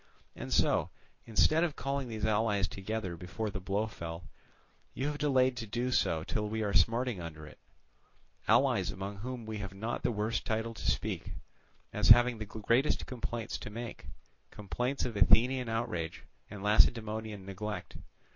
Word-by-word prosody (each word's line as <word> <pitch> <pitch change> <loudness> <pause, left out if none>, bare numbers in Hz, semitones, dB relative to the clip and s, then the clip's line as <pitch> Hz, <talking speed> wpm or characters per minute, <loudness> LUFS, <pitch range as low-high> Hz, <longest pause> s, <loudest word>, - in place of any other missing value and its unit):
And - - -7
so, - - +3 0.4
instead 155 +8 +4
of 165 -4 0
calling 140 -1 -2
these 110 -2 -3
allies 105 -3 +2
together 95 -2 -4
before 100 +5 -4
the 100 - -4
blow 100 +3 0
fell, 85 -5 -7 0.7
you 135 - -2
have 150 0 -2
delayed 130 -3 +3
to 115 - -4
do 120 +4 -1
so 80 -9 +2
till 105 +4 -2
we 110 0 -1
are 100 -1 -1
smarting 115 +3 +2
under 80 -2 -7
it; 75 - -14 0.9
allies - - +4
among 100 +1 -5
whom 120 +2 -6
we 110 -1 -4
have 100 -2 -6
not 110 +4 -3
the - - +1
worst 105 0 -1
title 110 +1 -2
to 110 - -3
speak, - - -2 0.6
as - - +1
having 120 0 +7
the 110 - -4
greatest 115 +7 +1
complaints 120 -3 -4
to - - -7
make, 115 +2 -7 0.4
complaints 125 +7 -2
of 120 - -4
Athenian 120 +6 +4
outrage 90 -8 -2 0.3
and 100 -1 -8
Lacedaemonian 110 -1 +2
neglect. 105 +2 -5
110 Hz, 160 wpm, -32 LUFS, 100-120 Hz, 0.9 s, having